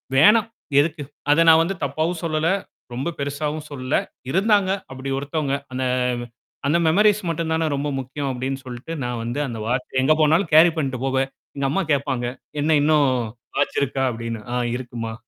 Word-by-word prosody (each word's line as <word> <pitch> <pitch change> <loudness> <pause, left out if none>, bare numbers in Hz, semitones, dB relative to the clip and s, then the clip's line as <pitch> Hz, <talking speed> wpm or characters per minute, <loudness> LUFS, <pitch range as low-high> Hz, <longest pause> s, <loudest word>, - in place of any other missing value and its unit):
வேணாம். 210 +10 +6 0.3
எதுக்கு? 155 0 0 0.3
அத 165 +3 +5
நான் 160 0 +8
வந்து 180 +4 -1
தப்பாவும் 155 +5 -1
சொல்லல! 155 -1 0 0.5
ரொம்ப 135 +8 -2
பெருசாவும் 150 +2 -3
சொல்லல! 130 -3 -1 0.3
இருந்தாங்க 200 +1 +3 0.2
அப்படி 135 +1 -6
ஒருத்தவங்க. 145 0 -1 0.2
அந்த 130 - -2 0.4
வ் - - -5 0.4
அந்த 155 - +3
மெமொரிஸ் 210 +5 +4
மட்டுந்தானே 160 0 0
ரொம்ப 140 +1 -2
முக்கியம் 135 +2 -4
அப்டின்னு 130 +1 -4
சொல்ட்டு, 125 +5 -8
நான் 120 -1 -3
வந்து 120 +5 -3
அந்த 115 -3 -5
வாட்ச 125 +1 -1
எங்க 155 - +5
போனாலும் 160 +3 +3
கேரி 165 +2 +8
பண்ணீட்டு 135 -5 -1
போவேன். 135 0 +1 0.3
எங்க 140 -1 0
அம்மா 195 +6 +1
கேட்பாங்க, 130 -3 -1 0.3
"என்னா 155 +2 +3
இன்னும் 150 -1 +4 0.5
வாச்சு - - 0
இருக்கா?" 135 0 -1
அபடின்னு. 115 -1 -5
"ஆ - - 0 0.2
இருக்கும்மா!" 120 -3 -5
145 Hz, 160 wpm, -22 LUFS, 130-160 Hz, 0.5 s, நான்